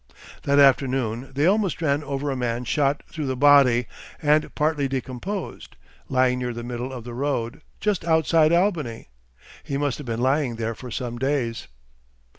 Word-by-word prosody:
That 140 0 +3
afternoon 130 -3 +2
they 145 +3 +2
almost 195 -1 +2
ran 150 -2 0
over 140 0 -3
a - - -2
man 120 -1 -2
shot 140 +2 0
through 155 -4 -5
the 130 - -1
body 130 -3 +5 0.3
and 150 0 +2
partly 150 -2 +1
decomposed, 135 +9 -5 0.3
lying 130 -1 +2
near 125 -1 -3
the 120 0 -6
middle 120 +2 -5
of 125 -3 -7
the 120 0 -8
road, 135 +1 -2 0.2
just 210 -6 0
outside 160 -1 +3
Albany. 170 - 0 0.5
He 140 - -3
must 145 -2 -1
have 145 - -8
been 115 -1 -2
lying 130 -1 +1
there 115 0 -3
for 125 +2 -9
some 120 0 -4
days.... 130 - -1
135 Hz, 165 wpm, -24 LUFS, 125-150 Hz, 0.5 s, body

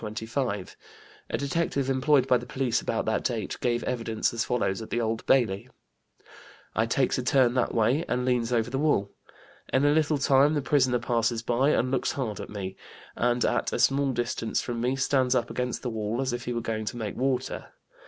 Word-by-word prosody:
A 110 -1 -5
detective 140 -1 -1
employed 135 0 +3
by 125 -2 +4
the - - -10
police 125 -3 0
about - - -2
that - - 0
date - - -2
gave 120 -1 0
evidence 115 -3 -1
as 115 - 0
follows 115 -4 -1
at 110 - -8
the 120 - -1
Old 115 -1 -1
Bailey; 110 -7 +2 1.1
"I 110 +1 +2
takes 130 +2 +1
a - - -2
turn 125 -1 +3
that 125 -2 +1
way 120 +8 +2
and 125 +1 0
leans 125 -2 +1
over 120 0 +1
the 135 - -1
wall. 140 -10 +1 0.6
In 135 +2 +3
a 145 - +5
little 155 -1 +2
time 140 +2 +4
the 145 - +1
prisoner 130 -3 +3
passes 115 -1 0
by, 125 +4 +2
and 130 -3 +1
looks 135 - 0
hard 125 -8 -3
at - - -7
me, 95 -2 -6 0.4
and 120 0 +1
at - - 0
a - - 0
small 135 +3 +3
distance 120 -2 -1
from 120 -2 -3
me 125 +2 +1
stands 130 -1 +2
up 120 -2 0
against 125 0 -3
the 125 - -2
wall 110 +1 -2
as 135 -2 -1
if 120 0 -4
he 120 - -2
was 115 -1 -3
going 110 -1 -3
to 120 - -4
make 110 -3 -4
water. 130 0 -1
125 Hz, 205 wpm, -27 LUFS, 115-135 Hz, 1.1 s, a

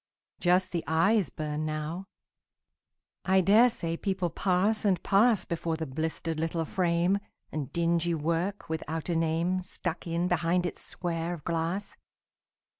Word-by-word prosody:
Just 180 +1 +3
the 170 -2 -2
eyes 170 - +3
burn 150 +1 -3
now. 155 +4 -3 1.2
I 190 0 +4
dare 210 +7 +6
say 165 -7 -3
people 185 -2 -1
pass 200 +4 +1
and 195 -3 +3
pass 215 +2 +4
Before 165 -1 -2
the 160 - -3
blistered 160 +3 -3
little 165 0 -1
frame, 175 +2 +1 0.3
And 145 -3 -4
dingy 170 0 +1
work 170 +5 -1
without 160 +1 -3
a 170 - +1
name 165 +3 +1
Stuck 180 -1 -4
in 170 +1 0
behind 175 0 +1
its 175 - -3
square 170 0 -2
of 155 - -13
glass. 170 +4 -2
170 Hz, 140 wpm, -29 LUFS, 160-185 Hz, 1.2 s, dare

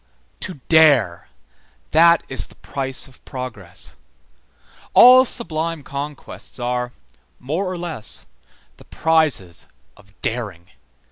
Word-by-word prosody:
To 185 - -5
dare; 140 - +4 0.6
that 170 +1 +6
is 130 - -2
the - - -18
price 135 -1 -4
of 130 - -20
progress. 110 -9 -7 1.0
All 255 +1 +9
sublime 165 - -2
conquests 140 -1 -6
are, 125 0 -2 0.5
more 165 +9 -2
or 185 - -4
less, 170 -11 -6 0.5
the - - -17
prizes 155 - +1 0.3
of 100 0 -22
daring. 100 -7 -4
135 Hz, 105 wpm, -21 LUFS, 115-160 Hz, 1.0 s, All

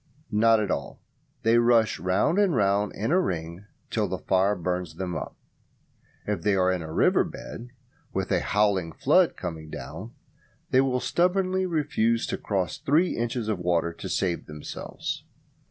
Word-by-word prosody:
Not 115 +1 +4
at 105 -3 -1
all, - - -4 0.4
they 115 +1 +5
rush 115 -2 +3
round 95 - +2
and 195 -7 +3
round 100 -1 +2
in 110 +7 -2
a 185 +2 +4
ring 85 - -4 0.3
till 110 -3 +1
the 95 0 -3
fire 95 +2 +2
burns 90 -2 -3
them 90 -1 -4
up. 80 - -6 0.9
If 105 -5 -2
they 100 +3 +2
are 95 -1 +3
in 90 -2 -1
a 80 -1 -7
river - - +3
bed, 120 +2 -8 0.4
with 95 -2 -2
a 95 - +3
howling 100 -4 +1
flood 170 - +3
coming 80 -4 -6
down, - - -8 0.6
they 130 - +5
will 130 -2 0
stubbornly 185 +6 +1
refuse 140 -9 +1
to - - -2
cross 95 -5 -2
three 160 +6 +2
inches 120 -1 -2
of 105 -4 -1
water 85 -1 0
to - - -7
save 90 -3 -1
themselves. 75 -1 -6
105 Hz, 165 wpm, -26 LUFS, 90-125 Hz, 0.9 s, they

